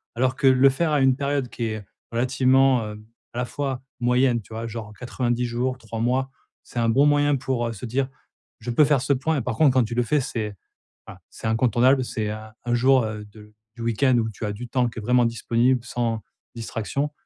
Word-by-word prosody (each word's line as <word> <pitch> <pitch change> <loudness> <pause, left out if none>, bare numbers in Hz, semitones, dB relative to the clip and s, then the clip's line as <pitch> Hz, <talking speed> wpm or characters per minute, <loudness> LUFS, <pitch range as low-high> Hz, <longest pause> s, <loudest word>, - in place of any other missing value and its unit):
Alors 130 +2 +1
que, 135 - +2
le 130 +1 +6
faire 155 +4 0
à 145 -2 +2
une 130 -1 +4
période 140 -2 -1
qui 120 - -4
est, 110 -2 -4 0.3
relativement, 130 0 +3
hem, 105 0 -11 0.3
à - - -8
la 125 - 0
fois, 135 -1 -3 0.2
moyenne. 125 0 +2
Tu 110 - -14
vois? 115 +1 -4
Genre 110 -2 -7
90 125 0 -1
jours, 125 +2 -2
3 115 -2 -7
mois, 130 +3 0 0.3
c'est 120 - -6
un 115 - +2
bon 135 +6 +4
moyen 145 0 +3
pour, 125 -2 -1
heu, 115 - -4
se 110 +3 -8
dire: 130 +3 -1 0.5
«Je 120 - -4
peux 135 +6 +5
faire 140 -3 +2
ce 135 +2 +2
point» 145 +4 0
et - - 0
par 120 -1 -3
contre 140 +1 +4
quand 130 - +5
tu 115 - -5
le 120 - +2
fais 150 +6 +1
c'est 110 -4 -4 0.5
ah, - - -10
c'est - - -8
incontournable 125 +3 +3
c'est, 110 -3 -3
heu, - - -3 0.3
1 120 0 0
jour, 130 +1 +4
heu, 105 -1 -5
de 105 0 -15 0.2
du 120 - -7
week-end 120 +3 +2
où 115 -1 0
tu 110 - -8
as 105 - -2
du 120 +4 -8
temps 125 -1 +1
qui 115 - -9
est - - -5
vraiment 125 +2 +3
disponible 120 +2 +1
sans 120 -2 -2 0.4
distraction 115 +6 -3
125 Hz, 225 wpm, -24 LUFS, 115-130 Hz, 0.5 s, le